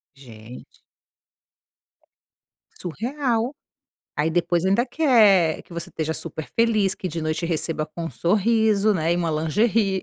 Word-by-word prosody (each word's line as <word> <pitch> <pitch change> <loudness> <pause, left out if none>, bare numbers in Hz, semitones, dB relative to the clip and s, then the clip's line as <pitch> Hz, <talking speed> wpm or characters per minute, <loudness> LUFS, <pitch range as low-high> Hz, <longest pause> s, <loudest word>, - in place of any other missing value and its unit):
Gente. 120 -3 -13 2.0
Surreal. 240 - -2 0.6
Aí 155 +2 +1
depois 175 +1 0
ainda 200 +7 +2
quer 215 - +4
que - - -17
você 170 - -6
esteja 160 0 -3
super 160 -1 -5
feliz, 215 -4 +2
que 185 - -5
de 165 +1 -5
noite 155 +1 -2
receba 160 -2 -2
com 165 +2 -7
um 165 - -4
sorriso, 215 +2 +2
né, 165 0 +1
e - - 0
uma 170 -2 -1
lingerie. 195 +5 +1
175 Hz, 130 wpm, -23 LUFS, 160-220 Hz, 2.0 s, quer